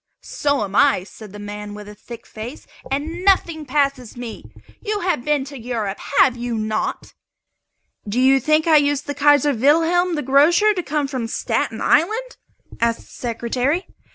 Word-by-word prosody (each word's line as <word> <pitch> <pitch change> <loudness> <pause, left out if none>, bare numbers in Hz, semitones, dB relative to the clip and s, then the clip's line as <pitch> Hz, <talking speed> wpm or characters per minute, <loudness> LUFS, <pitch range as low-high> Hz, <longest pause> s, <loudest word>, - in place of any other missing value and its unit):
"So 285 -5 -1
am 200 -1 -6
I," 275 -9 +4
said 210 +1 -12
the 205 - -10
man 205 0 -7
with 210 0 -10
a 210 - -9
thick 230 +2 -11
face; 230 +6 -9 0.2
"and 315 +6 -3
nothing 335 -6 +2
passes 275 -4 -1
me. 240 -2 -7 0.4
You 420 -1 -2
have 345 -9 -1
been 295 -2 0
to 280 -1 -9
Europe, 225 -4 -3 0.2
have 255 -2 +5
you 240 -1 -3
not?" 215 0 -3 1.0
"Do 225 +5 -1
you 265 +1 +5
think 310 +4 +2
I 320 -2 +6
used 290 0 +1
the 285 - -3
'Kaiser 290 0 +4
Wilhelm 330 +8 +2
the 295 - -2
Grocer' 310 +11 +4
to 370 - -2
come 300 -3 -1
from 255 -4 -3
Staten 225 -1 -2
Island?" 435 +12 +1 0.4
asked 230 0 0
the - - -19
Secretary. 250 - -2
275 Hz, 170 wpm, -20 LUFS, 230-310 Hz, 1.0 s, I